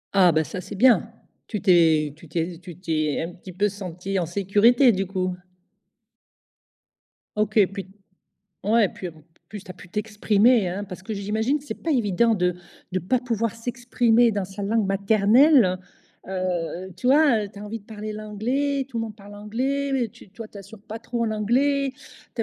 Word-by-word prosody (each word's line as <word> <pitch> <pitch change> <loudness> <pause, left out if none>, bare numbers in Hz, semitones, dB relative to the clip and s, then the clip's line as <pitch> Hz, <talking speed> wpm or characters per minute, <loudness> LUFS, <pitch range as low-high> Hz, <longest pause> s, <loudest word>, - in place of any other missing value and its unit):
Ah 180 -3 +6
bah 160 0 +2
ça 180 +4 -6
c'est 190 +3 -8
bien. 230 0 +4 0.4
Tu 210 - -3
t'es 160 -6 +4
tu 165 - -15
t'es 165 +1 -3
tu 175 -3 -10
t'es 155 -5 -1
un 180 - -9
petit 185 +2 -11
peu 200 +4 +1
senti 190 -1 -4
en 175 - 0
sécurité, 205 - +4
du 195 -2 -2
coup? 185 -1 -2 2.0
OK 215 -1 +3
puis 195 -2 -6 0.8
ouais, 215 0 +4
puis 180 - -7 0.4
plus, 210 -3 -8
tu 190 - -13
as 185 - -7
pu 185 - -14
t'exprimer, 210 +2 +2
hein. 190 +4 -4
Parce 185 -1 -9
que 205 - -6
j'imagine 220 +8 0
que 280 - -16
c'est - - -5
pas 330 - -1
évident 230 - +2
de 180 -3 +1 0.4
de 185 - +1
pas 185 +9 0
pouvoir 230 -3 -2
s'exprimer 240 0 +2
dans 200 -2 -1
sa 195 +2 -8
langue 215 +1 +1
maternelle. 205 +3 +4 0.5
Heu, 185 -1 -3
tu - - -5
vois, 265 -6 +4
tu 200 - -14
as - - -8
envie 210 +2 -5
de - - -24
parler 215 0 -7
l'anglais, 250 +7 -2
tout 240 -4 -5
le - - -1
monde 215 -2 -8
parle 205 -1 -13
anglais, 260 +4 -1
tu - - -17
toi 215 +2 -9
tu 205 - -12
assures 200 +2 -12
pas 220 +1 -7
trop 235 0 -3
en 225 - -1
anglais, 265 +6 +1 0.4
tu 230 - -1
210 Hz, 180 wpm, -24 LUFS, 185-230 Hz, 2.0 s, Ah